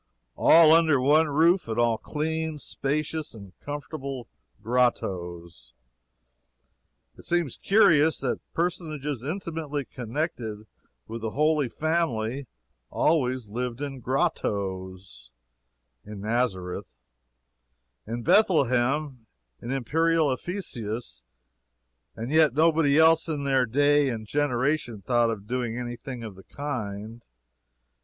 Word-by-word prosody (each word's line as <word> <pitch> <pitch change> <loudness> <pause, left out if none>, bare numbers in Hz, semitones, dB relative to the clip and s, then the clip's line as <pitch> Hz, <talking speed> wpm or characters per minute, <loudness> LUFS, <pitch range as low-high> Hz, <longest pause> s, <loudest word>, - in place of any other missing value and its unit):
All 160 -1 +7
under 160 -4 +4
one 150 +5 +4
roof, 165 +4 +3
and 110 0 -3
all 115 -2 +2
clean, 160 +2 -3
spacious, 150 +1 -3 0.3
comfortable 140 -4 -6 0.4
"grottoes." 85 - -2 1.4
It - - -14
seems 170 -7 0
curious 160 -7 +4
that - - -1 0.2
personages 155 -6 -2
intimately 155 -2 -4
connected 120 -4 -4 0.4
with 115 0 -6
the 110 - -2
Holy 150 +1 +1
Family 140 -5 -1 0.4
always 130 -7 +1
lived 120 +2 -4
in 140 -2 -5
grottoes 95 - -3 0.7
in 105 -1 -9
Nazareth, 100 -6 -2 1.1
in 115 +1 -4
Bethlehem, 135 - +2 0.3
in - - -7
imperial 155 +4 +1
Ephesus 120 - -5 0.9
and 115 +4 -5
yet 155 -4 +4
nobody 155 -2 +3
else 160 +1 +5
in 150 -3 -2
their 135 -3 +2
day 145 +3 +3
and 110 -3 -4
generation 130 -3 -1
thought 120 0 +2
of 105 -3 -4
doing 120 0 -2
any 120 -1 -4
thing 120 0 -8
of 110 -3 -7
the 95 0 -15
kind. 115 -5 -6
130 Hz, 105 wpm, -26 LUFS, 115-155 Hz, 1.4 s, All